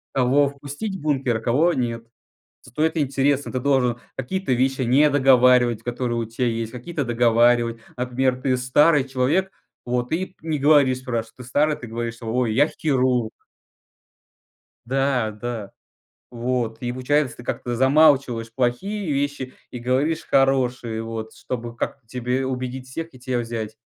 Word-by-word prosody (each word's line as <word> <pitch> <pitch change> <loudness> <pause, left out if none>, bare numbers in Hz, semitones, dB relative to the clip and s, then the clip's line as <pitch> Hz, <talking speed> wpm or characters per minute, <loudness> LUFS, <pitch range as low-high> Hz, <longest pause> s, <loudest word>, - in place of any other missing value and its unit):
кого 135 +2 +3
впустить 145 +9 -6
в 190 - -8
бункер, 135 -6 0
а - - -6
кого 145 +10 +2
нет? 115 -3 -2 0.6
Стоит 155 +6 -2
интерес: 140 -1 +1
ты 130 - -4
должен 125 -3 +1 0.2
какие-то 190 +2 -2
вещи 130 +2 +1
недоговаривать, 125 -3 +4
которые 120 -1 -2
у 115 - -1
тя 115 +3 -3
есть, 115 -1 -2
какие-то 140 +5 -4
договаривать. 120 0 +3 0.2
Например, 125 +1 0
ты 130 -1 +2
старый 140 +4 +3
человек, 145 +9 0 0.3
вот, 125 0 -2
и 185 +3 -2
не 160 -2 -2
говоришь. 140 -3 +4
Спрашивают: 115 -3 -4
"Ты 125 - -10
старый?" 150 +5 +1
Ты 130 - -9
говоришь: 115 0 -4
"Ой, 115 0 0
я 140 +6 +4
хирург!" 130 -7 0 1.6
Да, 130 -3 0
да. 115 -4 -5 0.6
Вот 120 -2 -2
и 120 -1 -2
получается, 130 +2 0
ты 120 - -10
как-то 120 0 -3
замалчиваешь 130 -3 +3
плохие 150 - -1
вещи 140 -2 -2 0.2
и 125 - -6
говоришь 135 +7 0
хорошие 125 -4 +1
вот, 110 -1 -6
чтобы 120 -2 -6
как 140 - -3
тебе 125 +2 -2
убедить 130 0 -4
всех 165 +3 -6
и 130 - -14
тя 125 0 -2
взять. 115 -2 -4
125 Hz, 145 wpm, -23 LUFS, 120-140 Hz, 1.6 s, недоговаривать